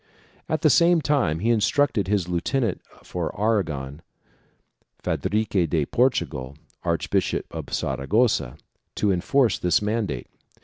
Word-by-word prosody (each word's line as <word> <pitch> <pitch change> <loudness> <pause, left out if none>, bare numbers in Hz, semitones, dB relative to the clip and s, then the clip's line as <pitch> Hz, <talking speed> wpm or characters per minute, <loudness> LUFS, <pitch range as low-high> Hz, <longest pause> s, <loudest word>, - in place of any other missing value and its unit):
At - - -1
the - - +6
same 170 0 +5
time 140 - +1
he 115 +3 +2
instructed 115 -1 +2
his 100 -3 0
lieu 90 -1 -1
tenant 120 -6 -1 0.2
for 90 +1 -4
Aragon, 80 -10 -1 1.0
Fadrique 100 -5 0
de 75 -1 +1
Portugal, 75 - 0 0.3
Archbishop - - -1
of - - -6
Sara 65 0 -2
gossa, 105 - +2 0.4
to 105 - +1
enforce 110 +6 +2
this 90 - +2
mandate. 105 - -2
100 Hz, 125 wpm, -24 LUFS, 80-115 Hz, 1.0 s, the